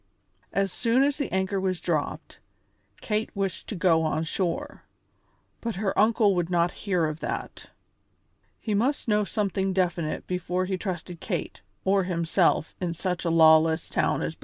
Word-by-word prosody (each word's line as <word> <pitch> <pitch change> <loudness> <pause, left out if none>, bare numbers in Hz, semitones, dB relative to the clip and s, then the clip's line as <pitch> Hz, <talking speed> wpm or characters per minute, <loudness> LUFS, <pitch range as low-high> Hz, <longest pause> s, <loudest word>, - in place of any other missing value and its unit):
As 195 -1 0
soon 240 +6 +2
as 285 +1 +1
the 285 - -2
anchor 190 +1 0
was 185 -2 -1
dropped, 155 -4 -3 0.6
Kate 215 0 -1
wished 195 -2 -3
to 215 - -4
go 165 -2 +3
on 155 0 0
shore, 200 - -3 0.8
but 230 -2 -3
her 195 0 -1
uncle 215 -1 +4
would 175 -2 -1
not 175 -1 +2
hear 180 -5 -1
of 155 0 -3
that. - - -5 0.9
He 215 - -2
must 250 +8 0
know 210 -1 +3
something 195 -2 -1
definite 175 -4 -1
before 180 0 -1
he 190 0 -1
trusted 180 -2 -5
Kate - - -4 0.2
or 195 0 +3
himself 170 -2 +1
in 170 -2 -2
such 180 0 -3
a - - +2
lawless 160 0 +5
town - - +1
as - - -2
Belize. - - -27
185 Hz, 160 wpm, -26 LUFS, 170-205 Hz, 0.9 s, lawless